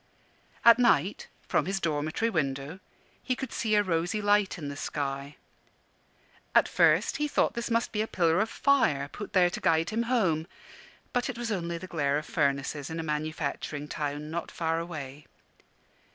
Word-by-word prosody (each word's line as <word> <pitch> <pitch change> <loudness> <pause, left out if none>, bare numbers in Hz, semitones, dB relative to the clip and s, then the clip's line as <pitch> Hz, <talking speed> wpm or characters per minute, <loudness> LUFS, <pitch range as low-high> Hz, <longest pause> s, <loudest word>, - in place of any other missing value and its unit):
At 235 +1 +8
night, 240 -1 +2 0.2
from - - +1
his 195 0 -1
dormitory 155 +7 -1
window, 145 0 -2 0.4
he 255 - -1
could 265 -1 -6
see 215 -2 +1
a 205 - +4
rosy 175 +3 0
light 205 -1 +2
in 150 -4 -6
the 140 - -5
sky. 140 -1 -4 1.2
At - - +6
first - - +3
he 300 - 0
thought - - +1
this 235 0 -3
must 230 0 +1
be 210 - -1
a 220 - -1
pillar 170 -3 +2
of 220 +1 +1
fire 225 - +2
put 210 - -8
there 180 -2 +4
to - - -5
guide 165 +3 +2
him 225 +2 0
home; 170 -10 +1 0.7
but 245 +2 0
it 245 - -4
was 240 -1 -3
only 170 -4 -2
the 180 - -8
glare 145 -5 0
of 150 - -4
furnaces 140 -1 -1
in 165 0 -4
a - - -2
manufacturing 150 -1 -3
town, 150 +1 -4
not 170 0 -3
far 165 -1 -1
away. 150 -4 -7
165 Hz, 175 wpm, -28 LUFS, 150-210 Hz, 1.2 s, At